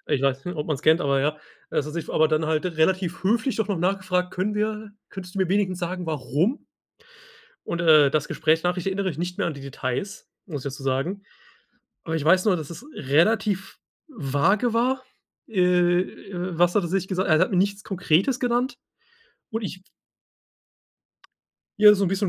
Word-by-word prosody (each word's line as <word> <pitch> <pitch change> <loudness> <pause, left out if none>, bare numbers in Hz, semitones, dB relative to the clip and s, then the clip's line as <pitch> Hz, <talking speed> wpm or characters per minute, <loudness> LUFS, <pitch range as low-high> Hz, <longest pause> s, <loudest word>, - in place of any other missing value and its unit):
Ich 135 - +1
weiß 135 -1 0
nicht, 180 -2 -5
ob 150 - -3
man 155 - 0
es 135 - -8
kennt, 160 +2 +4
aber 140 -4 +1
ja. 150 +2 0 0.3
Das 145 - -1
hat 150 - -6
sich 165 -1 -5
aber 155 0 +3
dann 155 0 +1
halt 155 +2 0
relativ 180 +1 0
höflich 225 +6 +1
doch 220 -2 -1
noch 195 -4 -1
nachgefragt: 180 0 0
„Können 195 +3 -1
wir, 215 0 -2 0.2
könntest 190 -1 -9
du - - -4
mir 190 -2 +1
wenigstens 190 -2 0
sagen, 180 -1 -4
warum?“ 155 - -1 1.0
Und, 170 - -3
äh, 155 -4 +6
das 150 0 0
Gesprächnachricht 165 +3 0
erinnere 190 0 -1
ich 155 - -7
nicht 180 +1 -4
mehr - - 0
an 170 - -3
die 140 - -10
Details, 135 - -5 0.2
muss 150 -8 -6
ich 140 - -2
dazu 135 +1 -9
sagen. 140 +10 -1 0.8
Aber 165 0 -2
ich 150 - -3
weiß 185 +3 +4
nur, 190 -4 +4
dass 155 0 -7
es 200 +10 -9
relativ 190 +7 +1 0.3
vage 190 - +1
war. 255 +3 +1 0.5
Äh, 180 -2 +3 0.3
was 175 -1 0
hat 205 - +3
er 170 - -3
sich 190 +1 -1
gesagt? 185 0 -1
Er 155 -2 +5
hat - - +2
mir 185 - 0
nichts 200 +2 +1
Konkretes 195 - +1
genannt 245 +2 0 0.8
und 225 0 -3
ich 185 -2 -6 2.0
Ja, 210 0 +9
so 200 - 0
ein - - +1
bisschen 195 +1 0
180 Hz, 190 wpm, -24 LUFS, 155-200 Hz, 2.0 s, Ja